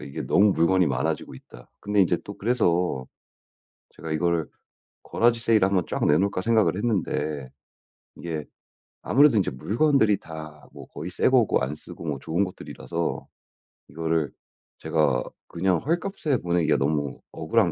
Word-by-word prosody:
이게 70 - -6
너무 100 0 +4
물건이 90 +2 +3
많아지고 70 +2 -2
있다. 60 -1 -15
근데 105 0 +1
인제 85 -2 +3
또 100 - -8
그래서 90 - 0 0.8
제가 80 - -7
이거를 85 0 0 0.6
garage 120 0 +2
세일을 110 -4 +4
한번 95 -4 +1
쫙 - - -1
내놓을까 95 +5 +2
생각을 110 -2 +2
했는데 80 - -2 0.7
이게 80 -3 -5 0.6
아무래도 140 -3 +5
이제 95 - +1
물건들이 110 -3 +2
다 80 -1 -9 0.2
뭐 - - -11
거의 80 - -7
새 - - +2
거고 125 -4 +3
안 65 +3 -2
쓰고 80 +2 -11
뭐 70 -3 -2
좋은 85 +8 0
것들이라서 85 -2 -5 0.6
이거를 80 -2 -1 0.5
제가 - - +1 0.2
그냥 90 +1 +1
헐값에 165 -3 -1
보내기가 85 -2 +1
너무 70 +1 -1
억울한 85 +4 +1
90 Hz, 330 characters per minute, -25 LUFS, 80-105 Hz, 0.8 s, 아무래도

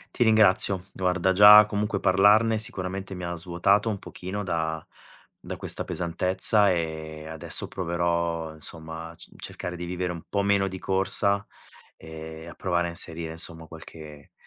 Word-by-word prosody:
Ti - - +2
ringrazio, 105 -4 +4
guarda 90 0 0
già 105 +2 +8
comunque 105 0 -3
parlarne 105 +5 +3
sicuramente 95 -2 -4
mi 90 - -8
ha 85 0 -4
svuotato 90 +5 0
un 105 - -3
pochino 95 +2 -8
da 80 -3 -4 0.5
da - - -8
questa - - +1
pesantezza, 95 +4 +3
ehm, 80 -2 -5
adesso 80 -2 -3
proverò 85 -2 -3
insomma 80 +1 -8
a 85 - -14
c - - -13
cercare 90 - -7
di 90 0 -7
vivere 90 0 -4
un 85 -2 -8
po' 100 -1 -1
meno 100 -1 +1
di 95 0 -7
corsa 100 +1 +2 0.5
e 80 0 -11
a - - -10
provare 85 -2 -2
a - - -5
inserire 85 -1 0
insomma 80 0 -5
qualche 80 -2 -13
90 Hz, 155 wpm, -25 LUFS, 80-100 Hz, 0.5 s, già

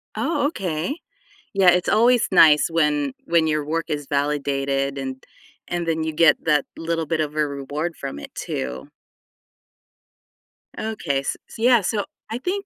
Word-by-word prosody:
Oh, 295 -4 0
okay, 180 - -3 0.6
yeah, 195 -2 +4
it's 180 +1 +1
always 240 +2 +4
nice 155 -4 +6
when 150 -4 +1
when 170 -1 +3
your 155 -1 +1
work 160 +2 -2
is 145 -2 -3
validated 140 -1 -1
and 130 -1 -5 0.5
and 175 -1 -2
then 160 -1 0
you 160 0 -2
get 165 +1 +5
that 150 -3 +3
little 165 0 -1
bit 160 +1 -1
of 150 -1 -2
a 150 -1 +2
reward 145 +4 -4
from 135 - -6
it, 70 - -10
too. 65 0 -5 1.9
Okay, 210 -11 -2
s 140 - -3
so, - - -11
yeah, 240 -1 +5
so 205 +2 -1 0.3
I 230 - -3
think 390 +8 -3
155 Hz, 155 wpm, -22 LUFS, 140-180 Hz, 1.9 s, nice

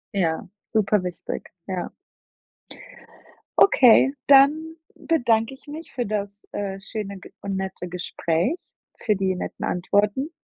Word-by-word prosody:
Ja, 165 -4 0 0.3
super 210 -2 +2
wichtig, 180 -1 -6 0.2
ja. 185 -2 -3 1.7
Okay, 265 - +7
dann 295 +4 +5 0.2
bedanke 240 -6 +1
ich 265 - -17
mich 315 +3 -9
für 245 - -2
das, 205 -1 -2 0.2
äh, 195 -1 -4
schöne 205 -2 -5
G - - -13
und 195 -1 -3
nette 190 -1 -4
Gespräch, 175 - -1 0.5
für 210 -3 +3
die 190 -1 0
netten - - -5
Antworten. 205 - +1
210 Hz, 120 wpm, -24 LUFS, 190-270 Hz, 1.7 s, Okay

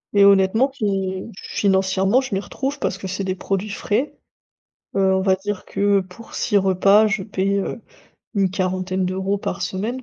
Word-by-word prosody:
Et 200 0 +7
honnêtement 200 +6 +5
qui 195 -7 -2 0.2
financièrement 195 +3 +2
je 260 -7 -4
m'y 195 - 0
retrouve 275 +6 -4
parce 190 - -1
que 190 - -5
c'est 190 +1 -3
des 185 - -1
produits 195 +2 -2
frais, 215 +7 -1 0.8
heu, 190 -1 +3
on 190 - +1
va 190 0 +3
dire 205 0 -5
que 200 -1 +2
pour 185 +5 -13
6 205 - +1
repas 195 +2 +4
je 200 -1 -1
paie, 200 -1 -1
heu, 220 +4 -4 0.5
une 195 -2 +2
quarantaine 185 0 -1
d'euros 190 +2 -1
par 195 -1 -4
semaine. 210 +8 -3
195 Hz, 175 wpm, -21 LUFS, 190-205 Hz, 0.8 s, Et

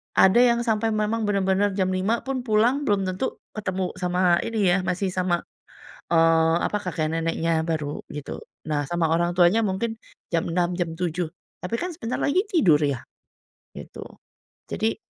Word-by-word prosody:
ada 190 +5 +6
yang 235 -1 +4
sampai 225 -1 +1
memang 215 +1 0
bener-bener 195 0 +1
jam 190 -1 +1
5.00 195 +5 0
pun 260 -2 -4
pulang 240 +7 +2
belum 200 -2 +2
tentu 185 +7 -2 0.2
ketemu 190 -3 -3
sama 180 -1 +2
ini 225 -2 -1
yah 190 - +3
masih 185 +1 -1
sama, 180 -2 0 0.7
eee, 165 0 +4
apa, - - -2
kakek 160 -4 -1
neneknya 165 0 0
baru, 155 -3 -3
gitu. 150 -1 -7 0.2
Nah 145 -1 0
sama 170 -2 +1
orang 170 +2 +1
tuanya 180 +6 +4
mungkin 215 +3 -2 0.3
jam 165 -1 0
6.00, 175 0 0
jam 175 -2 -2
7.00. 170 -1 -3 0.3
Tapi 180 - -3
kan 360 - -2
sebentar 240 -6 -3
lagi 365 +8 +2
tidur 195 - +5
yah, 140 -4 0 0.8
gitu. - - -9 0.7
Jadi 220 +1 0
185 Hz, 160 wpm, -24 LUFS, 165-215 Hz, 0.8 s, ada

